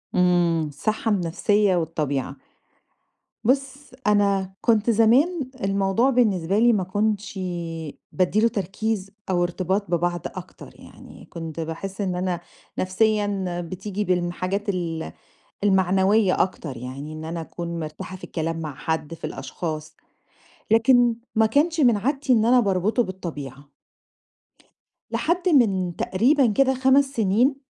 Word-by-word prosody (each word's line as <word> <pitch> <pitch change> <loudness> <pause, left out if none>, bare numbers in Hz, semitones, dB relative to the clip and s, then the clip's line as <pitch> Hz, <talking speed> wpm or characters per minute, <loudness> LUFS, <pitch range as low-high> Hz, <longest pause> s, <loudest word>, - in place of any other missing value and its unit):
إمم، 175 -3 +3
الصحّة 215 +10 -2
النفسية 200 +2 +2
والطبيعة. 150 -5 -2 1.1
بُص 270 +3 0 0.2
أنا 200 -2 +2
كنت 225 -1 +2
زمان 255 - +3
الموضوع 195 +5 +2
بالنسبة 205 -7 +2
لي 240 +1 +5
ما 200 -4 +1
كنتش 205 +1 -1
ي 170 -4 -5
بادّي 185 +3 +1
له 230 - +5
تركيز 200 0 -3 0.2
أو 175 -2 +2
ارتباط 185 +2 -1
ببعض 175 0 0
أكتر - - -8
يعني، - - -14
كنت 165 -1 -7
باحس 165 +5 -5
إن 185 -3 -1
أنا 180 -1 -1 0.4
نفسيًا 195 -2 0
بتيجي 190 +4 -4
بالم 180 -2 0
حاجات 195 +4 -3
ال 170 -4 -3 0.5
المعنوية 190 +1 +3
أكتر 155 -8 -6
يعني، 135 +5 -7
إن 155 0 -7
أنا 165 +1 -4
أكون 170 +1 -6
مِرتاحَة 155 +3 -6
في - - -23
الكلام 165 0 -3
مع 155 -4 -5
حد 160 +1 -3
في 165 - -6
الأشخاص. 155 +3 -6 0.8
لكن 240 +1 +5 0.2
ما 220 0 +5
كانش 305 +9 +2
من 240 -7 +5
عادتي 270 +4 +1
إن 220 -2 +3
أنا 250 +2 +5
باربطه 205 +2 +1
بالطبيعة. 145 - -7 1.4
لحد 350 +3 0
من 195 - +3
تقريبًا 255 +7 +2
كده، 265 +3 +3
5 265 +2 +4
سنين 240 +1 +2
190 Hz, 130 wpm, -24 LUFS, 170-225 Hz, 1.4 s, لي